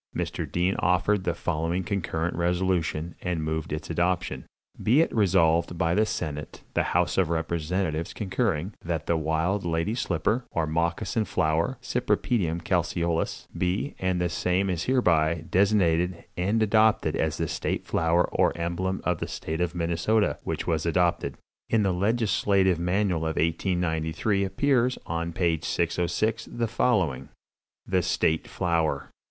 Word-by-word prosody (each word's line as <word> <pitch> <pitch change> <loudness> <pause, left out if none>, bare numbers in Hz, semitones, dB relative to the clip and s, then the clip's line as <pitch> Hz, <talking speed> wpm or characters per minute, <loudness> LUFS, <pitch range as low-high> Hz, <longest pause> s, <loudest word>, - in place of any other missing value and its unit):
"Mr. - - -3
Dean 90 +2 +1
offered 90 +3 +2
the 85 -1 0
following 85 +1 -1
concurrent 85 -3 -2
resolution, 85 -2 0
and 90 -3 -2
moved 80 0 -3
its 75 +2 -4
adoption: 85 +1 -1 0.3
"'Be 125 +7 +4
it 165 - +2
resolved 85 -4 +3
by 85 0 +1
the 105 +3 +3
senate, 75 -8 -5
the - - +2 0.2
house - - +1
of 90 -4 +2
representatives 85 0 -1
concurring, 95 -3 -1
that 85 -3 -2
the 85 - +1
wild 80 +5 0
Lady 85 +4 0
Slipper, 105 +2 0
or 85 - -1
Moccasin 85 +7 0
Flower 80 -4 0
('Cypripedium 85 -8 0
Calceolous'), 85 -2 -1
be, 95 +11 -1
and 95 -1 0
the 90 - +1
same 90 +3 0
is 85 -1 -2
hereby, 85 -10 +2
designated 90 -3 +2
and 100 +5 +1
adopted 110 +1 +3
as - - 0
the - - -1
state - - -2
flower 85 +2 +2
or - - +2
emblem 85 +3 -2
of 90 -2 0
the - - -3
State 80 +2 -4
of 90 0 -1
Minnesota,' 85 +6 +1
which - - -3
was 80 -2 0
adopted." 85 +1 +1 0.3
In 110 -2 +3
the 95 -2 +2
Legislative 100 -2 +2
Manual 90 0 +1
of 80 -1 -2
1893 85 +3 0
appears, 125 +5 +1
on 85 0 -2
page 85 -2 0
606, 90 +6 0
the 120 -1 -1
following: 95 - 0 0.6
"THE 95 -1 +1
STATE 80 -1 +1
FLOWER. 85 -3 -1
90 Hz, 145 wpm, -26 LUFS, 80-95 Hz, 0.6 s, Be